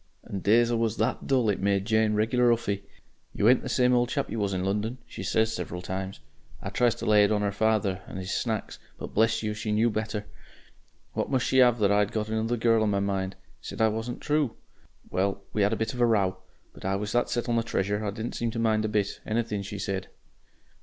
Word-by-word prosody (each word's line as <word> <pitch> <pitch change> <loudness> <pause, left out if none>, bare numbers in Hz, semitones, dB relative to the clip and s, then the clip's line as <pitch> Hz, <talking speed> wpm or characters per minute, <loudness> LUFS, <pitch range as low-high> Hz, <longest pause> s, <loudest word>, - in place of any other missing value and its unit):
And 95 - -5
days 115 +4 +4
I - - +1
was 115 -1 0
that - - -1
dull, 130 -4 +2
it 100 - -3
made 100 0 +1
Jane 110 -1 +2
regular 120 +3 +3
'uffy. 100 -4 0 0.5
'You 105 - +2
ain't 125 +1 +6
the 130 - -5
same 125 0 +3
chap 140 -1 -2
you 115 - -2
was 100 -1 0
in 95 -1 -1
London,' 105 +5 -1
she - - -9
says, 110 0 +1
several 90 -5 -5
times. 95 -2 -5 0.4
I - - -5
tried 120 -2 +3
to - - -7
lay 105 -1 +5
it 100 - +3
on 105 -1 +1
'er 100 - +1
father 100 -2 +1
and - - -7
'is 95 +1 -5
Snacks, 110 -4 -2 0.2
but - - -8
bless 110 +1 +2
you, 105 0 -1
she 105 0 -4
knew 110 +2 +3
better. 110 -1 -3 0.9
What - - -2
must 130 -2 +1
she 130 - +4
'ave 120 -2 +5
but 100 -2 +3
that 100 - +4
I'd 105 0 +2
got 110 -1 -2
another 110 +2 0
girl 115 -1 +3
on 110 - +2
my 100 -1 +1
mind! 95 -1 -1 0.3
Said - - -8
I 110 0 +4
wasn't 115 +3 -4
True. 150 -4 0 0.6
Well, 100 +1 0
we 105 - +1
had 100 +1 +3
a - - +1
bit 110 +3 -2
of 125 - -4
a - - +6
row. 100 -5 +2 0.4
But - - -14
I 95 +1 0
was 105 +1 -3
that 120 - +1
set 120 - -1
on 120 - +1
the 115 - +3
Treasure, 105 -2 -1
I 105 - -1
didn't 110 +3 -5
seem 115 - -1
to 115 - -5
mind 110 -1 +2
a - - -1
bit 105 -2 -1
Anything 110 -2 -1
she 100 +1 -6
said. 95 -1 -3
110 Hz, 240 wpm, -27 LUFS, 100-115 Hz, 0.9 s, ain't